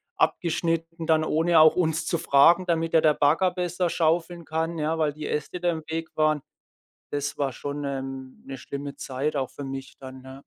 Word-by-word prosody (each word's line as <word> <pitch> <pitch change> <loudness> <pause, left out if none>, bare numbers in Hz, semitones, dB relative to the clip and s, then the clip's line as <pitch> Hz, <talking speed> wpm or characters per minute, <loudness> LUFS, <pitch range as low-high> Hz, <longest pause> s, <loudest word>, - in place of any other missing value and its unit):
abgeschnitten 165 0 -1
dann, 160 -1 +3
ohne 160 +1 +3
auch 155 0 +7
uns 165 -2 0
zu 170 - 0
fragen, 170 +3 +5
damit 165 -2 -1
da 160 - +5
der 155 -1 +4
Bagger 165 +6 +3
besser 180 0 -1
schaufeln 170 +1 0
kann, 160 +1 -2
ja, 155 +1 -1
weil 150 -2 +2
die 150 +1 -6
Äste 150 +4 -3
da 175 0 +1
im 160 -1 -5
Weg 160 0 -3
waren. 155 -1 +2 0.7
Das 145 0 -3
war 140 -2 0
schon 145 +2 -5
ähm 135 -1 -6
'ne 135 0 -7
schlimme 140 +1 -6
Zeit 135 +4 -3
auch 135 -2 -1
für 145 - -9
mich 135 0 -7
dann, 130 -1 -10
ja. 130 +1 -11
155 Hz, 195 wpm, -25 LUFS, 140-165 Hz, 0.7 s, auch